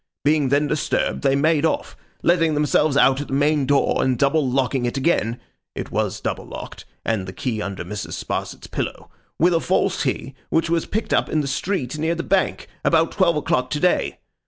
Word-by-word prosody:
Being 150 -2 +3
then 145 +2 +3
disturbed, 150 0 -1
they 135 -1 +3
made 155 +1 +2
off; 160 - -1 0.3
letting 165 -3 +3
themselves 150 -1 +2
out 135 -1 +4
at 145 - -6
the - - -6
main 145 -1 +2
door, 145 -1 +2
and 130 -2 +1
double 140 +1 +2
locking 130 -1 0
it 120 - -3
again 130 -6 +1 0.4
(it - - -5
was - - -1
double - - -4
locked, - - -8 0.2
and 105 -5 -1
the - - -5
key 110 0 -3
under 100 -2 -5
Mrs. 105 0 -5
Sparsit's - - -4
pillow) - - -5 0.3
with 175 +2 +4
a 165 - +3
false 185 +2 +1
key, 135 0 -2 0.2
which 165 0 +1
was 170 -1 +1
picked 220 +2 -2
up - - +2
in 155 - +1
the 140 - -3
street 150 -1 -2
near 160 +2 0
the 170 - -3
Bank, 190 0 0 0.2
about 165 0 +3
twelve 175 -4 +2
o'clock 135 -4 0
to 150 - -2
day. 180 +2 +1
145 Hz, 200 wpm, -22 LUFS, 135-165 Hz, 0.4 s, out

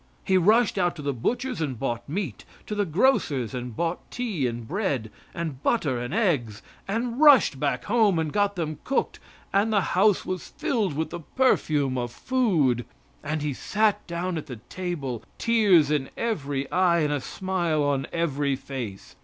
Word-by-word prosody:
He 190 - +2
rushed 210 +3 +4
out 175 -1 +1
to 150 - -8
the 140 0 -1
butcher's 245 - -2
and 135 -6 -2
bought 120 0 -3
meat, 190 +5 -3 0.2
to - - -5
the 205 -2 0
grocer's 150 - +2
and 125 -2 -5
bought 170 +6 -1
tea 210 - -2
and 115 -1 -5
bread, 145 - -2 0.2
and 160 -6 -5
butter 145 - +1
and 120 +2 -4
eggs, 145 - 0 0.2
and 230 +4 -2
rushed 280 - +6
back 135 -4 0
home 215 -5 +3
and 160 -2 -1
got 205 -1 +1
them 155 -4 -3
cooked, 270 - -1 0.3
and 205 +3 +3
the 205 -2 +3
house 195 +2 +3
was 185 -1 -4
filled 240 - -1
with 160 +2 -2
the 175 - -5
perfume 150 - +1
of 120 -1 -3
food; 165 - +1 0.4
and 155 0 -2
he 150 -2 -1
sat 210 +8 0
down 170 0 -2
at - - -10
the 125 - -6
table, 155 -10 -4 0.2
tears 200 -10 +4
in 145 -3 0
every 145 -12 -2
eye 175 -2 +3
and 150 -1 +1
a 145 - -1
smile 175 -3 -1
on 140 -1 0
every 145 -4 0
face. 125 -7 -7
165 Hz, 175 wpm, -26 LUFS, 135-205 Hz, 0.4 s, rushed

